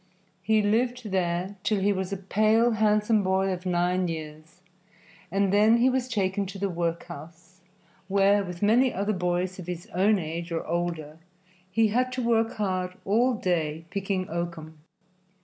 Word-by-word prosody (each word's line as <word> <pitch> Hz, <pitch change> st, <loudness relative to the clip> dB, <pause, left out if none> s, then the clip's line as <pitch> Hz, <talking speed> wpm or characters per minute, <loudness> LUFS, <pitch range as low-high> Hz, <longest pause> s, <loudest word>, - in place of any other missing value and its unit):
He 215 Hz, +1 st, +2 dB
lived 235 Hz, +1 st, 0 dB
there 185 Hz, +1 st, -1 dB
till 210 Hz, 0 st, 0 dB
he 200 Hz, +1 st, +2 dB
was 190 Hz, 0 st, -3 dB
a 195 Hz, -, -2 dB
pale, 215 Hz, +5 st, +2 dB
handsome 215 Hz, 0 st, +2 dB
boy 190 Hz, 0 st, +1 dB
of 185 Hz, 0 st, -4 dB
nine 180 Hz, +1 st, +1 dB
years, 155 Hz, +1 st, -8 dB, 0.7 s
and 195 Hz, 0 st, +1 dB
then 215 Hz, +3 st, +5 dB
he 250 Hz, +2 st, +4 dB
was 255 Hz, -1 st, -1 dB
taken 200 Hz, -4 st, -1 dB
to 195 Hz, -, -8 dB
the 195 Hz, 0 st, -2 dB
workhouse, 170 Hz, +1 st, -6 dB, 0.5 s
where, 200 Hz, +1 st, +3 dB
with 180 Hz, 0 st, -6 dB
many 240 Hz, +5 st, +4 dB
other 200 Hz, +3 st, -1 dB
boys 180 Hz, 0 st, -1 dB
of 180 Hz, -, -8 dB
his 175 Hz, 0 st, -5 dB
own 205 Hz, +4 st, +3 dB
age 170 Hz, 0 st, -5 dB
or 165 Hz, -, -2 dB
older, 165 Hz, -2 st, -3 dB, 0.5 s
he 220 Hz, +3 st, +2 dB
had 250 Hz, +4 st, +1 dB
to 255 Hz, -1 st, -2 dB
work 225 Hz, 0 st, +2 dB
hard 185 Hz, -3 st, -2 dB
all 235 Hz, +5 st, +2 dB
day 165 Hz, -5 st, -1 dB
picking 195 Hz, -1 st, -2 dB
oakum. 165 Hz, -2 st, -5 dB
190 Hz, 160 wpm, -26 LUFS, 175-215 Hz, 0.7 s, then